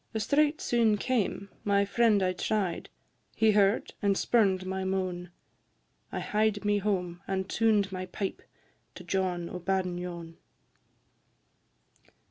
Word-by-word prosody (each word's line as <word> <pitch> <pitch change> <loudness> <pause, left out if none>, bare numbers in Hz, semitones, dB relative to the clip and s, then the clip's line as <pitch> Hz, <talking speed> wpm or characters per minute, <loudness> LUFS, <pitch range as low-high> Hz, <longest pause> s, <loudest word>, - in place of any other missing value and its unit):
A - - +1
strait 295 +7 +2
soon 230 -3 +2
came: 205 -4 -1
my 200 -1 +2
friend 215 -1 +3
I 185 0 +1
try'd; 190 -2 -2 0.5
He 220 -1 +4
heard, 205 +1 +2
and 200 -2 +2
spurn'd 195 -6 +2
my 190 0 -3
moan; 185 -2 -2 0.8
I - - -3
hied 210 -1 0
me 205 0 +2
home, 180 -3 -2
and 190 -1 -2
tuned 215 -3 +2
my 185 0 -5
pipe 195 +1 -4 0.5
To - - -9
John 180 -3 -1
o' 180 - -6
Badenyon. 175 -2 -3
195 Hz, 125 wpm, -29 LUFS, 185-210 Hz, 0.8 s, He